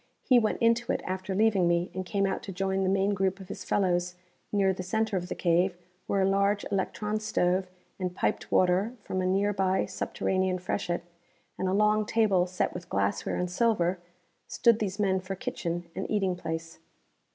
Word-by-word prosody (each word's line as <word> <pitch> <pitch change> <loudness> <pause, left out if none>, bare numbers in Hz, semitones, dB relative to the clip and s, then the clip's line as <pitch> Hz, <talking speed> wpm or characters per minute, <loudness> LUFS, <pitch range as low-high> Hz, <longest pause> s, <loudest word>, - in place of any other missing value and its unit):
He 255 -3 +5
went 220 -2 0
into 230 +2 +3
it - - -2
after 185 +1 -3
leaving 205 -4 +3
me, 170 +1 +1
and 185 - -3
came 195 +2 0
out 195 - -1
to 195 - -7
join 190 +1 -1
the 190 - +1
main 195 +1 +2
group 190 0 0
of 190 - -11
his - - -6
fellows 180 -2 0 0.4
near 195 -2 +3
the 185 - -5
center 220 +3 -1
of 180 -1 -2
the - - -3
cave 175 +1 +2 0.3
where 195 -1 +2
a - - +3
large 200 +1 +2
electron 210 +2 -1
stove, 185 -3 +1 0.3
and 180 -1 -3
piped - - -1
water 185 +5 +3
from 185 - -2
a 185 - 0
nearby 190 0 +1
subterranean 185 -1 -1
freshet, 180 -1 -2 0.5
and 190 - -2
a 185 - +1
long 210 +1 +3
table 200 -5 +3
set 180 0 -1
with 180 -1 -8
glassware 100 0 0
and 180 0 -2
silver, 185 -4 +1 0.5
stood 235 -1 +3
these 200 -2 -2
men 195 -3 +2
for 190 +1 -5
kitchen 175 -7 -4
and 190 - -4
eating 195 -4 +1
place. 165 -1 -5
190 Hz, 185 wpm, -28 LUFS, 180-205 Hz, 0.5 s, He